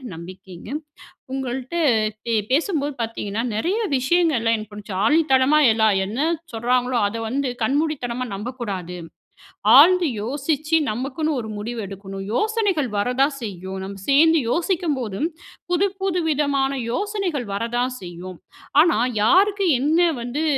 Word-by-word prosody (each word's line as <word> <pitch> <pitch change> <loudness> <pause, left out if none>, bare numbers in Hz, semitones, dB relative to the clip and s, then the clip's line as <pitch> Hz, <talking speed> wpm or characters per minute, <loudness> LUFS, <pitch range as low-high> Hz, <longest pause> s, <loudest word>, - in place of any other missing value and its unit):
நம்பிக்கைங்க. 185 +2 -11 0.6
உங்கள்ட்ட 260 +2 -4 0.5
பே 235 - -1 0.2
பேசும்போது 295 0 0
பாத்தீங்கன்னா, 225 -2 -3
நெறைய 345 - 0 0.2
விஷயங்கள்லாம் 260 -5 +2
எனக்கு 215 -1 -7
புடிச்ச 210 0 -9
ஆணித்தனமா 295 0 +4
எல்லாம் 220 -1 +3
என்ன 210 +5 -6 0.3
சொல்லுறாங்களோ, 245 +2 0
அத 205 - -6
வந்து 270 +3 -1
கண்மூடித்தனமா 255 -2 -1
நம்பக்கூடாது. 200 -5 -5 0.8
ஆழ்ந்து 345 +3 +7
யோசிச்சி 295 +5 0
நமக்குன்னு 280 +6 -2
ஒரு 220 - -7
முடிவு 230 +2 -4
எடுக்கணும். 195 0 -8
யோசனைகள் 410 - 0
வர 245 +5 0
தான் 280 0 +2
செய்யும் 190 -3 -6
நம்ப 195 0 -7
சேர்ந்து 320 +3 +5
யோசிக்கும்போதும், 310 - -1 0.4
புது 360 +3 +2
புது 360 -2 0
விதமான 280 -3 +1 0.2
யோசனைகள் 380 - -2
வரதான் 240 +4 -1
செய்யும். 180 0 -9 0.4
ஆனா, 335 -9 +2 0.2
யாருக்கு 390 - +4
என்ன 305 +5 +2 0.2
வந்து 245 +6 -3
260 Hz, 115 wpm, -22 LUFS, 220-315 Hz, 0.8 s, ஆழ்ந்து